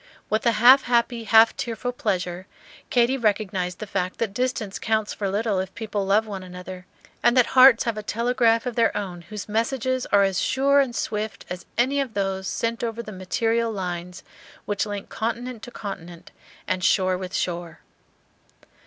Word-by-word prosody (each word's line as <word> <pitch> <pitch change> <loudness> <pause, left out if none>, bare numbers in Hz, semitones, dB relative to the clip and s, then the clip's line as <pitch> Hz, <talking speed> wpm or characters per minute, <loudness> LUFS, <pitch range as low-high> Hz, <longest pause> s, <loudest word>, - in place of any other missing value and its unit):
With 220 +2 +1
a 235 - +4
half 250 +5 +7
happy, 235 -1 +1
half 225 +1 +6
tearful 235 +1 -3
pleasure 185 -5 -3 0.4
Katy 245 +2 +3
recognized 195 -5 -1
the 215 - -6
fact 185 -2 -3
that 220 -4 -2
distance 235 -4 -2
counts 220 -1 0
for 200 -2 -3
little 205 0 0
if 190 0 -5
people 210 -2 -3
love 210 +3 +3
one 200 -3 -6
another, 180 0 -9 0.3
and 240 +2 +3
that 250 - +6
hearts 255 -2 +8
have 230 -4 -2
a - - -4
telegraph 230 +1 +1
of 250 - -2
their 225 -3 +2
own 185 -4 -5
whose 205 +3 -8
messages 250 +4 -1
are 200 0 +4
as 195 -2 +1
sure 280 +2 +3
and 260 -4 +1
swift 215 0 -3
as 180 0 -6
any 265 +4 +2
of 260 -5 -5
those 195 -1 -2
sent 230 0 -2
over 230 0 -3
the 215 - -8
material 225 +5 0
lines 180 -2 -5 0.4
which 205 +1 -1
link 205 -1 -6
continent 235 +1 -4
to - - -8
continent 180 -7 -8 0.4
and 185 -1 -1
shore 185 -1 +3
with 185 0 -6
shore. 175 -2 -3
215 Hz, 175 wpm, -24 LUFS, 190-235 Hz, 0.4 s, hearts